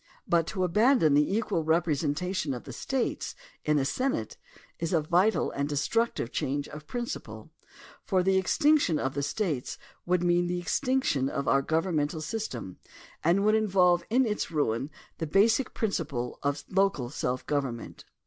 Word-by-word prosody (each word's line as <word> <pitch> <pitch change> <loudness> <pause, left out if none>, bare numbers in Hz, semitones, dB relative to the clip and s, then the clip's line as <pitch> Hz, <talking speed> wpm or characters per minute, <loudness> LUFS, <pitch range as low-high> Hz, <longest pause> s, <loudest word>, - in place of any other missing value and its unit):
But 165 -1 +2
to 185 -3 -2
abandon 210 - +4
the 150 +4 +3
equal 210 -7 -1
representation 160 0 0
of 120 - -8
the - - -9
States 265 -3 -2 0.3
in 150 0 +2
the 135 - +1
Senate 265 - -1 0.4
is 165 +1 -2
a 165 - +3
vital 180 +8 +2
and 140 +1 -2
destructive 150 - 0
change 140 +2 -2
of 150 0 -10
prin 240 -1 -3
ciple, - - -8 0.5
for 185 -2 +1
the 190 0 +3
extinction 290 - +3
of 135 -2 -2
the 140 - -2
States 145 - -2 0.3
would 180 0 +2
mean 175 0 +2
the 175 0 -1
extinction 180 - 0
of 140 - -3
our 135 - +4
governmental 160 0 0
system 150 - -5 0.4
and 180 +5 +3
would 215 - +4
in 220 0 +2
volve 180 -2 +4
in 255 +3 +3
its 210 -2 -2
ruin 140 -5 -1 0.3
the 160 - -2
basic 220 - +3
principle 150 - -2
of 140 0 -2
local 190 -10 +1
self 130 -3 -2
govern 140 -5 -1
ment. 115 - -11
170 Hz, 165 wpm, -28 LUFS, 145-200 Hz, 0.5 s, abandon